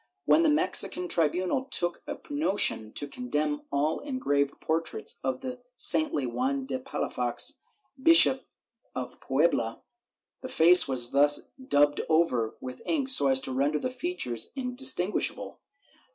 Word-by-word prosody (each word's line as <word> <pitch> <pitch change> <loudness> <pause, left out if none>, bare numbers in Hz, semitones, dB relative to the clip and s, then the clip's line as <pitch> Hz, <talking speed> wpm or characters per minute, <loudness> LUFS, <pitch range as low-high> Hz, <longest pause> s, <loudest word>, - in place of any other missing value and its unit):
When 320 - +4
the 325 - +3
Mexican 355 +4 +1
tribunal 180 - 0
took 175 -9 +1
a - - -6
notion 205 - +1
to 145 - -1
condemn 150 - -3
all 145 +3 -1
engraved 145 - -2
portraits 160 -8 -3
of 130 -1 -3
the 250 -1 -7 0.2
saintly 155 - +2
Juan 265 - -3
de 260 -1 -4
Palafox, 265 +1 -1 0.4
Bishop 295 -4 +5 0.5
of 125 -1 -7
Puebla, 135 -5 -1 0.6
the 260 - -8
face 180 -6 +5
was 125 -3 0
thus 145 +1 +3
daubed 145 - +1
over 130 -9 0
with 125 0 -9
ink 280 -5 -1
so 200 - +4
as 135 -1 +3
to 135 - -5
render 140 +3 0
the 255 - -4
features 255 - -3
indistinguishable. 250 -7 -1
165 Hz, 135 wpm, -27 LUFS, -, 0.6 s, Bishop